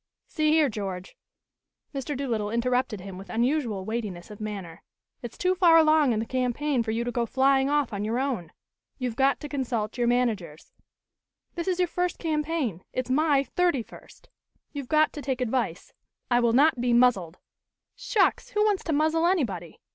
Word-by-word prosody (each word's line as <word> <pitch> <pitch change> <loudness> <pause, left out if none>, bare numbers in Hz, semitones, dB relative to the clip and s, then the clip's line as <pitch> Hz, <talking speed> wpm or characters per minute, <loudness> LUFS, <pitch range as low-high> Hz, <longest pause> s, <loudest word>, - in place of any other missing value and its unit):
"See 310 -1 0
here, 310 -1 +4
George." 195 -5 -5 0.8
Mr. 275 0 -4
Doolittle 230 -7 -2
interrupted 245 -2 0
him 190 -1 -8
with 195 -1 -11
unusual 235 -3 0
weightiness 210 -5 -5
of 210 - -11
manner. 195 -6 -6 0.4
"It's 240 -2 -8
too 365 +1 +2
far 350 -3 +5
along 310 -4 +5
in 225 - 0
the 220 - -1
campaign 255 +2 0
for 225 - -4
you 225 +2 -1
to 245 - -3
go 235 -1 -1
flying 270 +1 +3
off 290 -5 +1
on 200 0 -3
your 220 +3 -1
own. 250 - -2 0.5
You've 250 -4 -3
got 270 +2 +2
to 295 - -5
consult 250 -5 -3
your 240 - +2
managers. 215 -11 -1 0.8
This 340 0 -5
is 365 -2 +1
your 360 -1 +2
first 360 +1 -2
campaign; 300 - -2
it's 255 0 -3
my 290 0 +3
thirty 315 -2 0
first. - - -16 0.5
You've 280 -4 -6
got 310 0 +3
to 295 - -6
take 265 -2 -2
advice 240 -8 -2 0.2
" - - -51
"I 240 - +4
will 235 -1 +2
not 275 0 +4
be 245 -1 +1
muzzled." 215 -9 +3 0.6
"Shucks! 415 -5 +1
Who 420 - +1
wants 410 -3 +1
to 325 - -1
muzzle, 315 +3 +2
anybody! 200 - -1
250 Hz, 180 wpm, -26 LUFS, 220-300 Hz, 0.8 s, far